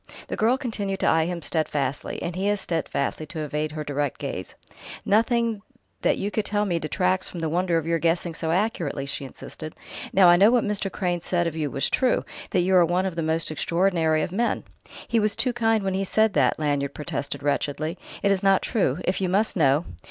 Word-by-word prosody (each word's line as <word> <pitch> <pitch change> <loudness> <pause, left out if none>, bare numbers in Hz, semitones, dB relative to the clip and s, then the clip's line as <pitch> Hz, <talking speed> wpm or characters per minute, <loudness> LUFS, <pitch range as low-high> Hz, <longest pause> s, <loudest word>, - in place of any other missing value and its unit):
The - - -2
girl 235 +4 +3
continued 205 -7 -3
to - - +1
eye 160 0 +4
him 175 -1 -4
steadfastly, 145 -4 -1
and 175 - -3
he 195 +2 0
as 205 -1 +1
steadfastly 155 -3 -2
to 155 +1 -5
evade 150 0 -2
her 155 -1 -4
direct 145 -1 -2
gaze. - - -5 0.5
"Nothing 230 0 +2 0.4
that - - +2
you 200 +1 -2
tell 210 -1 0
me 175 -4 0
detracts 180 +4 0
from 175 - -7
the 160 -1 -1
wonder 175 +1 +1
of 160 - -2
your 165 0 +1
guessing 170 +1 0
so 160 0 -3
accurately," 170 -7 0
she 140 0 -4
insisted. 155 +3 -8 0.4
"Now 190 -2 +6
I 175 0 +7
know 200 +4 +7
what 245 -1 +3
Mr. 205 -2 -1
Crane 175 -3 -1
said 175 0 0
of 165 -2 -2
you 155 -2 -1
was 135 - 0
true, 255 -2 +1 0.2
that 185 - +2
you 185 +2 +2
are 175 - +7
one 175 +3 +1
of 185 -3 -3
the 170 - -1
most 160 0 0
extraordinary 165 -1 +1
of - - -3
men." 230 +5 0 0.4
"He 230 - +2
was 210 -1 +1
too 250 - +1
kind 225 -3 +2
when 190 -1 -1
he 195 +1 0
said 220 +2 +2
that," 135 -4 +3
Lanyard 145 -2 -1
protested 140 -1 -4
wretchedly. 150 +3 -1 0.2
"It 200 - +4
is 195 -1 +1
not 195 -1 +3
true. 180 - 0
If 185 - 0
you 185 - +1
must 205 +4 +1
know...." 150 -1 +3
175 Hz, 215 wpm, -25 LUFS, 155-200 Hz, 0.5 s, I